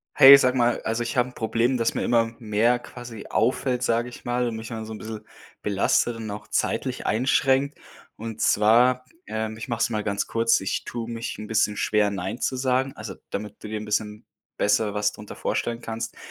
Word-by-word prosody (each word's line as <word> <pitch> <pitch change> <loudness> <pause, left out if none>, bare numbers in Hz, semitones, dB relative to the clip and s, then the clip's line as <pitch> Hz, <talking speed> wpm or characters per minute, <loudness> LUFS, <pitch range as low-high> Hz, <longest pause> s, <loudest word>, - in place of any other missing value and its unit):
Hey, 135 +1 +11
sage 130 -1 +2
mal, 120 0 +2
also 115 +2 -2
ich 115 - -4
habe 125 0 +2
'n - - -16
Problem, 115 +3 +1
dass 115 -1 +1
mir - - -2
immer 115 -1 +2
mehr 115 +2 +2
quasi 120 -3 -10
auffällt, 125 +2 +1
sage 115 +1 +1
ich 120 - -13
mal, 120 0 0
und 115 - -5
mich 110 0 -7
immer 115 -2 -5
so 110 - -9
'n - - -7
bissel 110 0 -7 0.4
belastet 105 +3 +1
und 110 -1 -6
auch 105 - -7
zeitlich - - -1
einschränkt. 135 +4 +2 0.4
Und 110 0 -6
zwar, 120 +4 +4 0.2
ähm, 110 0 -3
ich 110 +4 -7
mache 115 -1 -2
es - - +2
mal 105 -2 -2
ganz 100 -1 -1
kurz, 115 0 +2
ich 95 - -2
tue 120 -1 -5
mich 115 0 -5
'n 105 - -6
bisschen 105 -1 +1
schwer 105 -1 +2
nein 100 +4 -4
zu 130 - -1
sagen, 130 +1 +1
also 105 -2 -7
damit 105 +1 -6
du 105 - -6
dir 110 - -3
'n 105 - -7
bisschen 105 +1 -2 0.3
besser 105 0 +2
was 105 0 0
drunter 105 - -10
vorstellen 115 0 -2
kannst. 115 -1 -5
115 Hz, 210 wpm, -25 LUFS, 105-120 Hz, 0.4 s, Hey